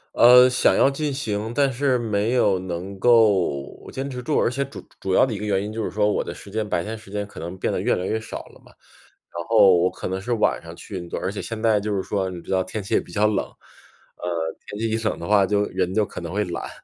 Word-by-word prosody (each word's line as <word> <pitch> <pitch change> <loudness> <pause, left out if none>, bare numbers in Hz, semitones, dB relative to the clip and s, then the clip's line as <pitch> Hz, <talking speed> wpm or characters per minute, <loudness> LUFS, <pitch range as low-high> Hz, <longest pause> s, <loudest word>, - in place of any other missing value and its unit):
呃， 125 +1 +8
想 125 - +3
要 - - +5
进 145 +1 -2
行， 110 -4 -3
但 140 0 +3
是 130 0 +1
没 110 -1 0
有 100 -7 +3
能 95 +2 -6
够 100 - +2
坚 135 +1 -4
持 125 -2 -5
住， 150 +4 0
而 - - +2
且 135 +2 -1
主 135 - -11
主 95 - -2
要 - - +6
的 125 - -4
一 - - -4
个 105 - -5
原 100 -2 +1
因 105 - -5
就 110 0 -3
是 - - -2
说 105 0 +1
我 - - 0
的 - - -5
时 100 - -12
间， 110 0 -2
白 85 -4 -1
天 110 +3 -5
时 110 -2 -15
间 105 +1 -3
可 100 - -12
能 85 +3 -6
变 - - -1
得 - - -1
越 - - +1
来 90 - -3
越 110 - -1
少 110 - -7
了 - - -18
嘛。 - - -19 0.6
然 85 - -4
后 105 -4 +6
我 90 +2 +3
可 - - -6
能 95 +1 -3
是 120 +4 -2
晚 110 - +1
上 85 0 -10
去 100 - -9
运 85 -1 -7
动， - - -4
而 95 - -2
且 100 - -5
现 115 -1 -6
在 110 -2 +3
就 105 0 -2
是 95 - -1
说 95 -2 -1
你 90 -2 -7
知 - - -9
道 95 -1 +2
天 100 +3 -5
气 95 - -5
也 - - +5
比 - - -11
较 105 0 +2
冷， 105 -2 +1
呃， 85 -2 -7
天 105 - -7
气 115 - 0
一 110 - 0
冷 - - -1
的 85 - -7
话 100 -2 +5
就 105 +1 +1
人 90 - -2
就 110 +1 +2
可 - - -8
能 85 +1 -6
会 105 +1 +1
懒。 85 - -5
105 Hz, 305 characters per minute, -23 LUFS, 95-115 Hz, 0.6 s, 呃